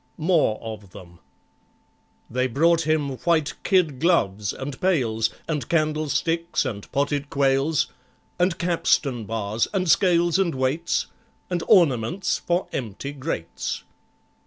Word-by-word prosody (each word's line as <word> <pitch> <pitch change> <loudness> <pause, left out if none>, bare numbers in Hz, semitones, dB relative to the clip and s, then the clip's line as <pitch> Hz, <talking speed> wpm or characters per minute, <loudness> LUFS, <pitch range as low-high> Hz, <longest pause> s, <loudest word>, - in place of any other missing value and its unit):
More 160 -9 +2
of 105 -4 -8
them 85 -3 -13 1.1
They 125 +2 0
brought 165 +5 +2
him 145 -4 0
white 160 -2 +1
kid 165 -9 +2
gloves, 105 - +1
and 135 0 -7
pails, 115 -12 +1 0.2
And 150 -7 -3
candlesticks, 155 +1 0
and 100 -4 -5
potted 145 0 -1
quails, 140 +2 +2 0.5
And 180 -1 +2
capstan 145 -8 +1
bars, 110 0 -1
and 185 -1 +1
scales 175 0 +3
and 175 -6 +1
weights, 135 +6 0 0.5
And 175 -1 0
ornaments 170 - +3
for 175 +2 -1
empty 125 +3 -4
grates. 135 - -4
145 Hz, 115 wpm, -24 LUFS, 120-170 Hz, 1.1 s, scales